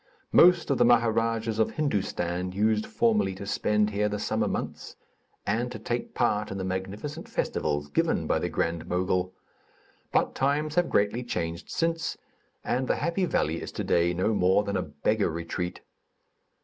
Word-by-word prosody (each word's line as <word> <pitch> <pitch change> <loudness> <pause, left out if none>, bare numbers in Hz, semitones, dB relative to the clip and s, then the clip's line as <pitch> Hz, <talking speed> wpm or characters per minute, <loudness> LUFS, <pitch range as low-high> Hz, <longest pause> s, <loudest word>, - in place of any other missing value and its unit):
Most 175 -3 +6
of 135 - +1
the - - +6
Maharadjas 115 -1 +2
of 110 - +1
Hindustan 90 - -1
used 105 +2 +1
formerly 220 - +1
to 100 - -7
spend 105 +1 +1
here 105 +1 +1
the 105 - -2
summer - - 0
months, - - -4 0.5
and 120 +4 0
to 120 - -5
take 120 +3 -4
part 105 -3 +1
in 95 - -4
the 95 - -3
magnificent 100 - -4
festivals 75 -1 -1
given 75 - 0
by - - +1
the - - -2
Grand 85 -1 -2
Mogul; 90 0 0 0.8
but - - +2
times 145 +3 0
have 175 0 +2
greatly 105 +4 +1
changed 85 -7 -4
since, 165 0 -1 0.5
and 130 +1 -1
the - - +2
happy 170 +2 0
valley 80 - 0
is - - -6
today 85 0 +1
no 95 +5 0
more 95 +1 +3
than 100 -1 -3
a 95 - +1
beggar 90 +8 0
retreat. 85 +2 -4
105 Hz, 160 wpm, -27 LUFS, 90-120 Hz, 0.8 s, Most